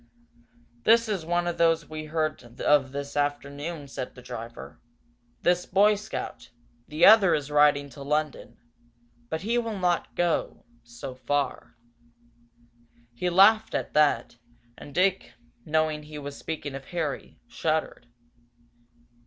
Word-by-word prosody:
"This 230 - +5
is 190 -7 -3
one 175 0 +1
of 175 -1 -3
those 165 -2 +3
we 155 0 -6
heard 155 -6 -3
of 140 -3 +3
this 140 +1 -6
afternoon," 145 +2 -3
said 130 -2 -6
the 125 - -12
driver. 120 -2 -9 0.6
"This 180 0 +2
Boy 205 +3 +5
Scout. 205 0 -6 0.4
The 155 +2 +3
other 205 -4 +7
is 145 -1 -4
riding 145 -1 +4
to 140 +2 -12
London 150 +1 -2 0.7
but 160 - -3
he 230 +5 +1
will 225 -3 -3
not 180 -2 0
go, 175 -2 -1 0.2
so 120 +2 -8
far." 135 +2 -2 1.4
He 180 +10 -1
laughed 215 +5 +5
at - - -3
that, 145 -6 +2 0.4
and 145 - -12
Dick, 190 +1 +1 0.3
knowing 155 0 0
he 150 0 -10
was 145 -1 -7
speaking 150 -3 -5
of 135 0 -7
Harry, 160 -4 -4
shuddered. 155 -6 -2
155 Hz, 130 wpm, -26 LUFS, 140-175 Hz, 1.4 s, other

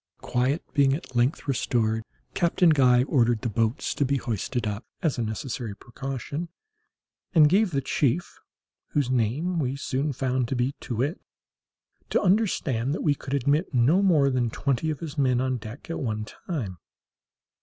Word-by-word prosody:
Quiet 130 +6 0
being 140 -2 +4
at 140 -4 -9
length 125 +6 +1
restored, 115 -4 +1 0.3
Captain 175 0 +3
Guy 125 -4 +5
ordered 120 -5 +2
the 120 - 0
boats 110 +2 0
to - - 0
be 140 +1 +1
hoisted 120 0 -2
up, 105 +2 -3 0.2
as 150 -6 +1
a - - +1
necessary 110 0 -4
precaution, 135 +7 -5 0.9
and 155 -2 +8
gave 195 +6 +3
the 140 -5 -1
chief 145 +5 0 0.5
(whose 140 -4 +1
name 135 +9 0
we 135 -2 -1
soon 140 +1 -1
found 130 -1 -1
to 135 - -2
be 125 +2 +1
Too 120 - -5
wit) 140 - -1 0.9
to - - +2
understand 160 - +1
that - - -4
we 150 - +4
could 140 -1 -4
admit 140 +3 +1
no 140 +11 +4
more 155 -8 +4
than 125 -2 +1
twenty 140 +5 -1
of 155 0 -3
his 155 -2 -5
men 130 -3 +3
on 130 0 0
deck 110 +4 -9
at 165 - -4
one 110 -4 -2
time. 110 - -5
135 Hz, 165 wpm, -26 LUFS, 120-150 Hz, 0.9 s, and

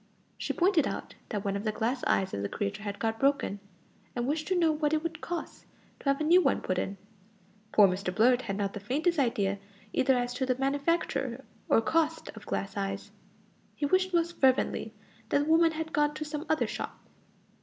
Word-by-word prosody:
She - - -3
pointed 350 -5 +3
out - - -5 0.2
that 205 -2 -3
one 200 0 0
of 200 - -3
the 215 - 0
glass 240 +4 -1
eyes 190 -1 +1
of 100 - -2
the 100 - -2
creature 205 0 -3
had 205 -1 -4
got 225 0 -1
broken, 275 -7 +1 0.6
and 240 0 -1
wished 300 +3 -1
to 370 - +1
know 330 -2 +4
what 300 0 0
it 310 0 +1
would 330 -1 -4
cost 345 -1 -6 0.3
to 275 - -1
have 275 - +2
a - - 0
new 345 +4 +6
one - - +2
put 185 -1 -1
in. 195 +2 -3 0.7
Poor 205 -2 +7
Mr 185 0 -2
Blurt 245 +6 +4
had 195 -5 -4
not 200 -1 -1
the - - -5
faintest 300 - 0
idea 200 -6 +1 0.3
either 260 0 +3
as 245 0 -1
to 260 +1 -1
the 255 -1 +1
manufacture 275 -2 0 0.2
or - - +5
cost 320 +6 0
of - - -12
glass 195 +2 -3
eyes. 195 0 -3 0.6
He 295 - -1
wished 370 +5 +2
most 340 -1 0
fervently 260 -4 +2 0.4
that 285 - +3
the - - -3
woman 325 +1 +4
had 320 0 -4
gone 295 0 +2
to 305 - -4
some 300 +1 -5
other 315 - +2
shop. - - -5
270 Hz, 210 wpm, -29 LUFS, 210-315 Hz, 0.7 s, Poor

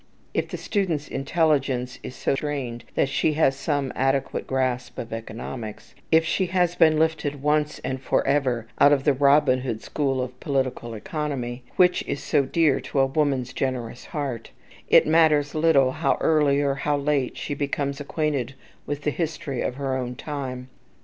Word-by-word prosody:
If - - 0
the - - -5
student's 175 -8 -1
intelligence 135 -4 0
is 125 - -8
so - - 0
trained 135 -5 -4
that - - +2
she 145 +2 +1
has 145 -3 +3
some 140 -2 -1
adequate 135 +1 0
grasp 130 -1 -1
of 115 -1 -6
economics, 115 0 -7 0.2
if 160 0 +5
she 185 +3 0
has 180 -1 +1
been 155 -2 +5
lifted 150 -3 0
once 150 0 +1
and 130 0 -3
forever 130 -4 +1
out 145 - +7
of 135 -2 +1
the 145 - +4
Robin 140 -1 +4
Hood 120 -4 -4
school 135 -3 -1
of 125 0 -4
political 130 -4 -2
economy, 130 -1 -4
which 180 -1 +4
is 140 - -3
so 140 - +2
dear 160 -1 +2
to 140 - -2
a 135 - +5
woman's 135 -3 0
generous 125 -3 -3
heart, 135 -7 -4 0.4
it - - +7
matters 155 -2 +3
little 155 -5 +4
how 140 +1 0
early 150 -3 +3
or 140 -1 +1
how 145 +1 0
late 140 -2 0
she 145 - -4
becomes 140 0 -2
acquainted 145 -3 -2 0.3
with 145 0 -4
the 150 - +1
history 150 -5 -3
of 125 - -2
her 135 -1 -2
own 125 -1 -3
time. 130 -3 -5
140 Hz, 170 wpm, -24 LUFS, 130-150 Hz, 0.4 s, out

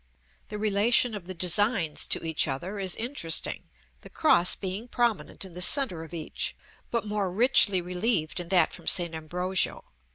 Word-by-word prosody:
The 210 - -7
relation 215 +3 +1
of 195 -4 -8
the 185 - -7
designs 180 -1 +1
to - - 0
each 160 -2 0
other 175 +10 -5
is 190 -2 0
interesting; 225 - -2 0.3
the - - -13
cross 180 - +3
being 195 +5 -6
prominent 235 -5 -2
in 185 - -13
the 180 - -6
centre 185 - +3
of 160 - -13
each, 165 -3 -5 0.3
but 235 -3 -2
more 205 -3 -2
richly 205 -3 +4
relieved 180 -2 -2
in 175 -1 -6
that 185 -2 +3
from - - -11
St. 175 -3 +4
Ambrogio. 180 +4 -1
185 Hz, 165 wpm, -26 LUFS, 175-215 Hz, 0.3 s, richly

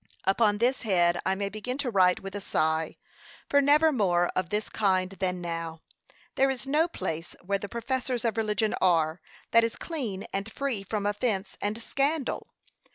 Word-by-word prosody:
Upon 205 +2 +3
this 245 +4 +1
head 175 -5 +2
I 190 - +2
may 200 +1 -2
begin 215 +6 -4
to 275 -4 -2
write 185 -3 +4
with 195 0 -7
a 205 - -4
sigh, 160 -2 0 0.5
for 285 - +4
never 300 +3 +5
more 175 -9 +2
of 185 -2 -1
this 210 +1 -1
kind 185 -3 +1
than 185 -2 -2
now! 165 -1 -5 0.5
There 270 0 +3
is 265 0 -3
no 300 +5 +2
place, 165 - -5
where 200 +1 0
the 205 - -6
professors 250 0 -2
of 230 - +1
religion 215 -1 +1
are, 165 -2 +3 0.3
that 230 0 +6
is 230 - -1
clean 240 - -4
and 195 +3 -3
free 270 -6 -1
from 205 +1 -3
offence 205 -1 -1
and 210 +2 -1
scandal. 280 +4 -1
205 Hz, 175 wpm, -28 LUFS, 185-245 Hz, 0.5 s, that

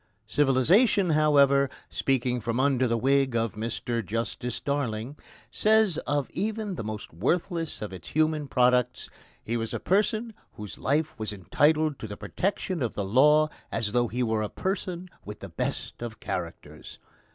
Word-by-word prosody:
Civilisation 150 - +3
however, 140 -3 +4 0.2
speaking 125 -2 0
from 115 +2 -2
under 130 -2 +3
the 115 0 +1
wig 135 +1 +2
of 115 -1 0
Mr 115 +1 -3
Justice 115 +4 -3
Darling, 135 -3 -2 0.4
says 215 -6 +3
of 145 -1 0
even 215 +1 -2
the 165 - -5
most 105 -4 -6
worthless 165 - -1
of 105 - -6
its 85 -3 -9
human 155 -1 +1
products: 125 -2 +2 0.3
"He 115 - -2
was 115 -1 -3
a - - -2
person 215 +4 +1 0.2
whose 105 -2 -9
life 150 +3 0
was 110 -1 -3
entitled 150 - +1
to 110 - -6
the 105 - -7
protection 185 - -2
of 120 -4 -2
the 100 - -2
law 150 +8 +5 0.2
as 110 -2 -1
though 120 +1 +2
he 125 +3 -2
were 110 -2 0
a 105 - -2
person 185 -2 -3 0.2
with 105 0 -8
the 100 - -8
best 85 - -4
of 115 -1 -6
characters." 85 -2 -6
130 Hz, 160 wpm, -27 LUFS, 115-155 Hz, 0.4 s, law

